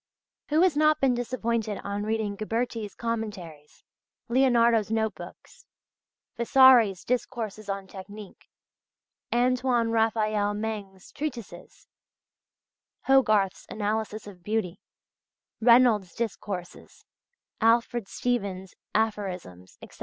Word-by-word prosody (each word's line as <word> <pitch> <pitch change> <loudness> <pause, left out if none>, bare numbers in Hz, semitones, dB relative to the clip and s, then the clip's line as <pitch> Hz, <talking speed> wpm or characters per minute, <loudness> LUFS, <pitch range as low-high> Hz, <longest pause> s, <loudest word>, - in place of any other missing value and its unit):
Who 310 +2 +3
has 365 -5 +3
not 305 0 +3
been 265 -2 +3
disappointed 235 -3 -2
on 200 0 -3
reading 215 -1 -2
Ghiberti's 225 0 -3
commentaries, 205 -10 -6 0.5
Leonardo's 235 -4 +3
note 220 -1 0
books, - - -13 0.8
Vasari's 235 -5 +5
discourses 225 -4 -3
on 195 0 -3
"Technique," 200 +1 -11 0.8
Antoine 245 -1 +1
Raphael 215 -2 +1
Mengs's 205 -3 -6
treatises, 235 - -7 1.2
Hogarth's 215 -8 +2
Analysis 215 0 -3
of 195 -4 -12
Beauty, 210 -2 -2 0.8
Reynolds' 230 -6 +4
Discourses, 200 -5 -6 0.6
Alfred 230 -1 +2
Stevens' 200 -7 -3 0.2
Aphorisms, 185 - -3
etc.? - - -14
220 Hz, 90 wpm, -26 LUFS, 200-240 Hz, 1.2 s, Vasari's